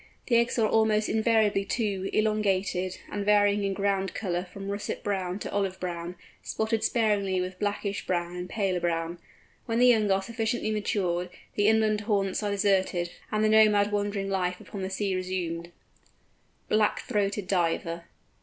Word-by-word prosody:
The 240 - +2
eggs 235 +2 +1
are 220 -2 +3
almost 215 -1 +2
invariably 220 -2 +2
two, 195 -2 -2
elongated, 200 -4 0
and 205 - -2
varying 205 0 +3
in 195 -1 -1
ground 195 -1 0
colour 180 -3 -2
from 195 0 -7
russet 200 0 -4
brown 190 -3 -2
to - - -6
olive 195 -2 -1
brown, 175 -1 -4 0.3
spotted 220 0 -1
sparingly 205 -5 +1
with 185 0 -4
blackish 205 -1 -2
brown 175 -1 -1
and 180 0 -5
paler 195 -4 0
brown. 170 0 -2 0.5
When 230 -1 0
the 245 - +5
young 220 -4 +4
are 195 0 +2
sufficiently 225 0 -2
matured, 180 -4 -1 0.2
the 205 0 +2
inland 215 -1 +3
haunts 200 -2 0
are 210 - -1
deserted, 190 -3 +1 0.2
and 215 0 +1
the 215 - +4
nomad 210 -1 +5
wandering 205 -1 -1
life 180 -2 -1
upon 200 - -8
the 190 - -3
sea 195 0 -1
resumed. 175 -2 -3 1.0
BLACK 215 -1 +2
THROATED 205 -1 -1
DIVER. 170 -2 0
200 Hz, 160 wpm, -27 LUFS, 185-215 Hz, 1.0 s, the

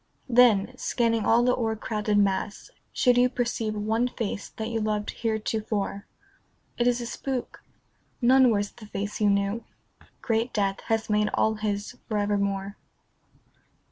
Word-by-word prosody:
Then, 245 -2 +4
scanning 230 -3 +1
all 235 +1 +5
the 250 0 +3
o'ercrowded 220 -2 -1
mass, 200 - 0 0.2
should 245 -1 +3
you 250 0 +4
Perceive 235 -3 -2
one 220 +3 0
face 225 -4 -4
that 220 0 -5
you 225 -1 -2
loved 210 -1 -1
heretofore, 220 -2 -2 0.7
It 240 - +3
is 245 0 +2
a - - -4
spook. 255 +1 -5 0.6
None 255 +1 +5
wears 205 -2 0
the 220 -3 -13
face 205 +1 -4
you 210 - +4
knew. 200 +3 0 0.6
Great 230 +1 -1
death 195 -2 0
has 225 0 0
made 210 0 +2
all 220 - +2
his 210 +2 -3
for 215 - 0
evermore. 200 -1 -1
220 Hz, 140 wpm, -26 LUFS, 205-240 Hz, 0.7 s, all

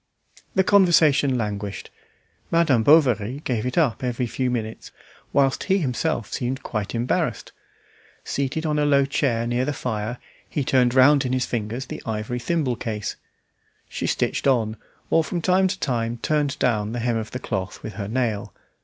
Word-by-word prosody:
The 190 - +4
conversation 160 -9 +4
languished; 105 -3 -4 0.6
Madame 165 -8 +3
Bovary 130 -3 +3
gave 120 -2 -1
it 125 - -4
up 140 -8 +2
every 125 0 -1
few 125 +2 -2
minutes, 115 -3 -4 0.4
whilst 135 -1 +2
he 195 0 +3
himself 135 - -1
seemed 130 +1 -3
quite 110 0 -3
embarrassed. 120 +2 -1 0.7
Seated 140 +4 -2
on 150 -1 +1
a 150 - +2
low 140 -1 +4
chair 130 -4 0
near 120 +1 0
the 145 +2 -1
fire, 115 -2 -3 0.3
he 145 - -1
turned 125 -1 +2
round 140 +2 +6
in 130 -1 -2
his 130 -1 +1
fingers 115 +3 -3
the - - -7
ivory 110 +2 -3
thimble 135 -3 -1
case. 110 -3 -4 0.7
She - - -3
stitched - - 0
on, 115 -5 +2 0.4
or 165 - +4
from 175 +2 -3
time 185 +3 +3
to 190 +1 -3
time 120 -3 -1
turned 150 -2 0
down 110 -5 0
the 120 - -2
hem 120 0 0
of 110 -1 -4
the - - -5
cloth 95 -5 -4
with 110 - -6
her 100 -2 -5
nail. 110 -4 -2
125 Hz, 170 wpm, -23 LUFS, 115-145 Hz, 0.7 s, round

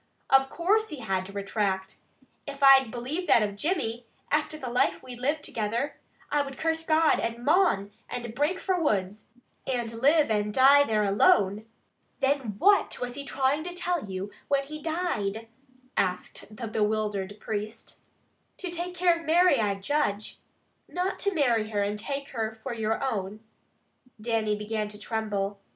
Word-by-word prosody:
Of 270 0 +5
course 425 +8 +1
he 300 -5 -7
had 190 -4 -1
to - - -10
retract! 195 -1 -2 0.5
If 280 0 -5
I 270 -1 +8
believed 255 +10 -4
that 230 - +6
of 205 -1 -2
Jimmy, 240 - -2 0.2
after 300 +1 0
the 255 -5 -6
life 245 - +1
we 255 -1 -8
lived 290 +5 -1
together, 230 +5 -2 0.4
I 295 - +3
would 275 -1 -6
curse 325 0 0
God 315 0 +3
and 230 +1 -3
mon, 300 - +3 0.2
and 240 -2 -5
break 295 +9 0
fra 375 -1 0
the - - -2
woods, 205 - -1 0.4
and 240 -3 -2
live 285 +3 +3
and 210 -1 +1
dee 275 +4 +7
there 215 -1 +2
alone." 205 - +3 0.5
"Then 270 -6 0
what 400 - +3
was 245 0 -4
he 280 +2 -6
trying 275 +2 0
to 355 +1 -6
tell 350 - -2
you 190 +2 -5 0.2
when 280 -1 +2
he 305 +2 -8
died?" 230 - -2 0.5
asked 185 +3 -2
the 235 -1 -4
bewildered 210 -2 -1
priest. 215 +1 -5 0.6
"To 365 -2 -5
take 350 +1 -4
care 350 -1 +3
of 335 - -12
Mary, 340 -3 +5
I 205 -2 +1
judge." 205 -1 -2 0.5
"Not 365 +2 -2
to 400 -1 0
marry 235 -8 +2
her; 205 -2 0
and 205 +1 -2
take 275 +4 -4
her 220 -2 -3
for - - -3
your 225 +1 -1
own?" 215 -5 -3 0.8
Dannie 220 -1 0
began 210 0 -3
to 210 0 -11
tremble. 205 -2 -3
240 Hz, 165 wpm, -27 LUFS, 210-300 Hz, 0.8 s, I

